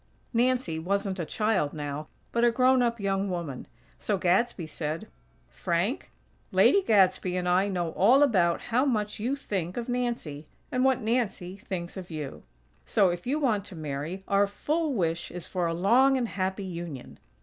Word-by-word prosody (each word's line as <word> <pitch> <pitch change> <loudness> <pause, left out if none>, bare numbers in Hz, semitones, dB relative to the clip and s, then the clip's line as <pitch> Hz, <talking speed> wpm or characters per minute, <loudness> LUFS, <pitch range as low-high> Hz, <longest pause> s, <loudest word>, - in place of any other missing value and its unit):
Nancy 245 -8 +1
wasn't 195 +2 -1
a 165 - -3
child, 210 -10 0
now, 150 0 -5 0.2
but 235 - +1
a 240 - +6
grown 255 +2 +4
up 235 -1 0
young 195 0 0
woman; 170 -8 -4 0.3
so 205 - 0
Gadsby 185 +1 +1
said: 155 +1 -4 0.4
"Frank, 170 - -2 0.4
Lady 400 - +5
Gadsby 190 - +3
and 180 0 -1
I 185 +3 +3
know 175 -4 -2
all 245 - +5
about 180 -11 +3
how 245 +3 +1
much 215 -7 -1
you 245 +6 0
think 190 - -4
of 235 - -3
Nancy; 235 - -3 0.2
and 255 0 +1
what 265 -1 +3
Nancy 215 -5 -1
thinks 185 -3 -6
of 185 -2 -7
you. 150 -4 -6 0.4
So, 195 -3 +3
if 175 +5 -6
you 280 +4 +1
want 230 -9 +1
to 190 - -10
marry, 155 +4 -5
our 200 0 +3
full 305 +10 -1
wish 165 -4 -1
is 180 -1 -7
for 180 -2 -1
a 165 - -1
long 250 +9 +4
and 240 -3 -1
happy 190 +1 -2
union. 170 -7 -7
195 Hz, 170 wpm, -28 LUFS, 170-235 Hz, 0.4 s, a